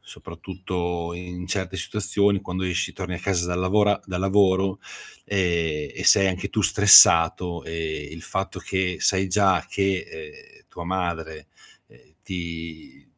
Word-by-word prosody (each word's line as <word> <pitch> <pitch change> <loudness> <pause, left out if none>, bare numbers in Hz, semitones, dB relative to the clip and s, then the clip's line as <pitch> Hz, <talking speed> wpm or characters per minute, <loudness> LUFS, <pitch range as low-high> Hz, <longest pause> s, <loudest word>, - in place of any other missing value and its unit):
soprattutto 85 0 -6
in 90 0 -8
certe 95 0 -4
situazioni, 100 +1 0
quando 95 -1 -6
esci, 90 +1 -2
torni 90 -2 -6
a - - -6
casa 90 -3 -1
dal 90 0 -3
lavora 100 +2 +1
da 90 -2 -5
lavoro, 95 0 +1 0.5
ehm, 85 -6 -1
e - - -7
sei 95 -1 +5
anche 95 0 -4
tu 110 - -1
stressato, 85 -3 +6
ehm, 80 -3 -6
il 80 +1 -10
fatto 95 +2 -5
che 95 -1 -2
sai 95 0 +1
già 95 -1 +2
che, 95 -1 0
ehm, 75 -1 -13
tua 85 - -9
madre, 85 -4 -5 0.4
ehm, 75 - -25
ti 85 -3 -8
90 Hz, 140 wpm, -23 LUFS, 85-95 Hz, 0.5 s, stressato